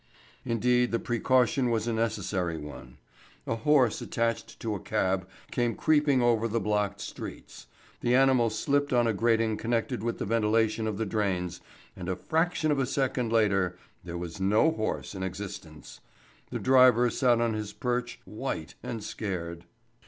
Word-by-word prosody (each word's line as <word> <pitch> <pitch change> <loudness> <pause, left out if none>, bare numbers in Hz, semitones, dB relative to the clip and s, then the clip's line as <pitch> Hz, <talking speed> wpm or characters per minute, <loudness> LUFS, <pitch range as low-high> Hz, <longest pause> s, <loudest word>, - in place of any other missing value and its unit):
Indeed, 125 +1 +2
the 115 - +2
precaution 125 +2 +2
was 115 -2 0
a 120 - -1
necessary 105 -6 -1
one. 75 -5 -10 0.5
A - - -1
horse 130 -1 +3
attached 115 -1 -2
to 110 -2 -2
a 100 - -3
cab 95 0 -1 0.2
came 120 -3 0
creeping 145 -4 +3
over 115 -1 +3
the 115 +1 0
blocked 105 -2 -1
streets; - - -8 0.3
the 120 +1 +2
animal 130 -3 +4
slipped 145 +6 0
on 120 -1 +4
a 115 - +2
grating 115 0 +2
connected 115 -3 -1
with 115 +1 -2
the - - -3
ventilation 110 0 +1
of 105 -2 -2
the 110 - -1
drains, 95 -5 -2 0.3
and 90 -1 -6
a 95 - 0
fraction 160 - 0
of 145 - +1
a 130 - +1
second 130 -3 -1
later 100 -5 +2 0.3
there 85 0 -6
was 85 +2 -6
no 105 +12 +4
horse 110 -8 -3
in 95 - -6
existence. 90 -4 -7 0.5
The - - -3
driver 125 -2 +5
sat 120 -3 +3
on 115 -1 +1
his 105 -1 -4
perch, 120 +2 -2
white 80 +1 -5
and 115 -3 -5
scared. 85 -6 -5
115 Hz, 160 wpm, -28 LUFS, 100-120 Hz, 0.5 s, driver